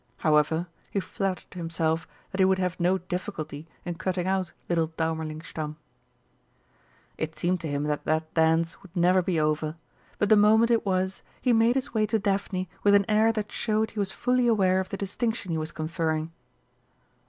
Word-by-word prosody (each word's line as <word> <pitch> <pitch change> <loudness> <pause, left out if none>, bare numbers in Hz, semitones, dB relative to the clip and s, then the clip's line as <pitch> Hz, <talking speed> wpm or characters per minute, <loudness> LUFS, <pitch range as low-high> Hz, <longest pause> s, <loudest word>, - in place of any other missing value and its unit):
However, 155 +2 +2 0.2
he 200 - -1
flattered 190 +1 -3
himself 165 -1 -1 0.2
that 190 - -5
he 190 - +6
would 190 0 +3
have 185 -1 -2
no 180 +2 +3
difficulty 170 -4 -5 0.2
in 175 - -2
cutting 185 -1 -1
out 190 -3 0 0.2
little 165 -2 +1
Daumerlingstamm. 160 -1 -4 1.4
It 160 0 -3
seemed 175 +3 0
to 165 - -4
him 145 -1 -1
that 150 -1 -2
that 155 0 0
dance 160 0 +2
would 190 -1 -16
never 180 +1 +4
be 180 -3 0
over, 155 0 0 0.4
but 205 - +1
the 215 - +8
moment 220 +3 +5
it 230 -3 +2
was, 190 0 0 0.2
he 250 - +2
made 230 +2 +4
his 265 -3 -2
way 215 -2 +2
to 220 +1 +2
Daphne 195 -2 -1
with 205 0 +5
an 200 -1 +4
air 220 +1 +4
that 215 -2 -4
showed 220 -1 0
he 215 - -6
was 195 -1 0
fully 250 0 +1
aware 190 -5 +3
of 190 - -3
the 195 - -4
distinction 200 0 -2
he 160 - 0
was 155 0 -4
conferring. 160 0 -2
185 Hz, 180 wpm, -27 LUFS, 160-205 Hz, 1.4 s, the